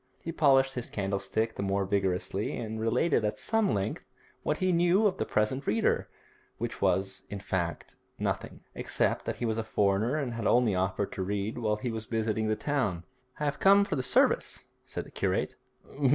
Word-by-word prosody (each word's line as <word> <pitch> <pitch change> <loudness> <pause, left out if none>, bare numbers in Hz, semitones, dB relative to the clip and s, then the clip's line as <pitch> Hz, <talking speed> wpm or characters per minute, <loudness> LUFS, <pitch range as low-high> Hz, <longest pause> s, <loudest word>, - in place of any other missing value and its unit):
He 165 - -3
polished 135 -4 +4
his 125 -2 -5
candlestick 100 +3 -1
the - - -5
more 100 0 0
vigorously, 95 0 -1
and 110 -1 -4
related 120 +5 +2
at 105 - -1
some 225 -5 +1
length 100 0 -2 0.4
what 150 - 0
he 185 0 +1
knew 175 +4 +4
of 200 - +2
the - - -1
present 130 +6 0
reader, 110 +2 +1 0.5
which - - -4
was, 95 0 +1
in 100 - -5
fact, 90 -3 -3 0.2
nothing, - - -3
except - - 0
that - - -2
he 120 - -3
was 110 0 0
a - - -1
foreigner 105 +3 +1
and 140 -6 -2
had 115 -2 -2
only 120 -4 +4
offered 95 +2 -1
to - - -4
read 100 +4 -2
while 105 -2 +1
he 115 +3 -3
was 110 -1 -5
visiting 110 -1 0
the 110 - +2
town. 110 - -1 0.4
'I 150 - -1
have 140 -1 -1
come 200 +1 +6
for - - -2
the 130 - 0
service,' 125 - +2 0.2
said - - -5
the - - -14
curate. - - -1
110 Hz, 190 wpm, -29 LUFS, 100-135 Hz, 0.5 s, come